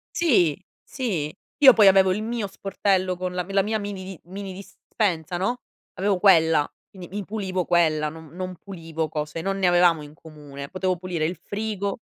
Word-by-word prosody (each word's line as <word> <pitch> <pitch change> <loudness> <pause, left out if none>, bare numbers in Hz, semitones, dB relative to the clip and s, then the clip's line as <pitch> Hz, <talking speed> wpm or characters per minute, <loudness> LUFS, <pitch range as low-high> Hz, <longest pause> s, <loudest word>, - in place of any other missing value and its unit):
Sì, 195 - +3 0.2
sì. 180 - -3 0.3
Io 265 -4 +9
poi 210 -3 +6
avevo 190 -1 +6
il 205 +3 -1
mio 230 -2 -2
sportello 195 -1 0
con 180 0 -4
la 180 -1 -2
la 195 0 +3
mia 215 +2 -1
mini 190 -3 -6
mini 195 +2 -7
dispensa, 180 -3 -3
no, 240 +7 -1 0.3
avevo 195 0 0
quella, 160 -6 +5 0.2
quindi 180 -3 -11
mi 205 +1 -5
pulivo 190 -3 -3
quella, 155 -3 +2
non 160 -1 -12
non 185 0 -5
pulivo 165 -4 -5
cose 150 +1 -4
non 195 +1 -2
ne 190 -2 +2
avevamo 175 -3 +4
in 145 0 -11
comune. 145 -3 -10
Potevo 185 -1 -1
pulire 175 -3 -2
il 175 +3 -3
frigo 200 -1 -4
185 Hz, 175 wpm, -24 LUFS, 165-200 Hz, 0.3 s, Io